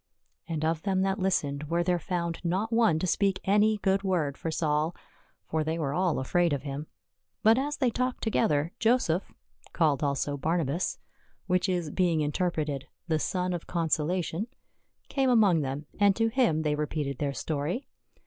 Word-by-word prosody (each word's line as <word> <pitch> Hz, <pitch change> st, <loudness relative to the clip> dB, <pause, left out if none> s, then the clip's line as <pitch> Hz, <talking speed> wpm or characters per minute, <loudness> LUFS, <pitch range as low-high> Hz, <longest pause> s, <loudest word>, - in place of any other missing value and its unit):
And 160 Hz, -3 st, -2 dB
of 160 Hz, 0 st, 0 dB
them 190 Hz, 0 st, +1 dB
that 195 Hz, +1 st, 0 dB
listened 150 Hz, -6 st, 0 dB
was 170 Hz, +3 st, 0 dB
there 180 Hz, -1 st, +2 dB
found 170 Hz, -1 st, -2 dB
not 190 Hz, +6 st, -1 dB
one 225 Hz, -8 st, +4 dB
to 160 Hz, -, -1 dB
speak 195 Hz, +1 st, +1 dB
any 210 Hz, +2 st, +3 dB
good 195 Hz, -1 st, +1 dB
word 175 Hz, -8 st, 0 dB
for 165 Hz, -, -4 dB
Saul; 155 Hz, +1 st, 0 dB, 0.5 s
for 160 Hz, 0 st, -1 dB
they 160 Hz, +1 st, -2 dB
were 145 Hz, -4 st, -1 dB
all 180 Hz, +1 st, +1 dB
afraid 170 Hz, +5 st, +1 dB
of 140 Hz, -, -2 dB
him. 145 Hz, +1 st, -5 dB, 0.6 s
But 225 Hz, +3 st, +6 dB
as 290 Hz, +2 st, -2 dB
they 255 Hz, -4 st, +2 dB
talked 255 Hz, +2 st, -2 dB
together, 170 Hz, -9 st, +1 dB
Joseph, 220 Hz, -7 st, +2 dB, 0.4 s
called 155 Hz, -5 st, +2 dB
also 145 Hz, 0 st, 0 dB
Barnabas, 165 Hz, +2 st, -1 dB, 0.5 s
which 180 Hz, +1 st, +1 dB
is 175 Hz, -4 st, -1 dB
being 175 Hz, -4 st, +2 dB
interpreted, 150 Hz, -3 st, -1 dB, 0.2 s
the 160 Hz, -1 st, +2 dB
Son 180 Hz, +2 st, -1 dB
of 175 Hz, -, -5 dB
Consolation, 170 Hz, +3 st, -1 dB, 0.6 s
came 270 Hz, -2 st, +1 dB
among 205 Hz, -9 st, +5 dB
them, 140 Hz, +2 st, -3 dB
and 200 Hz, -1 st, +5 dB
to 225 Hz, 0 st, +2 dB
him 225 Hz, -, +2 dB
they 150 Hz, -1 st, +1 dB
repeated 150 Hz, -2 st, -2 dB
their 140 Hz, -2 st, -1 dB
story. 160 Hz, -, -2 dB
170 Hz, 170 wpm, -28 LUFS, 150-195 Hz, 0.6 s, But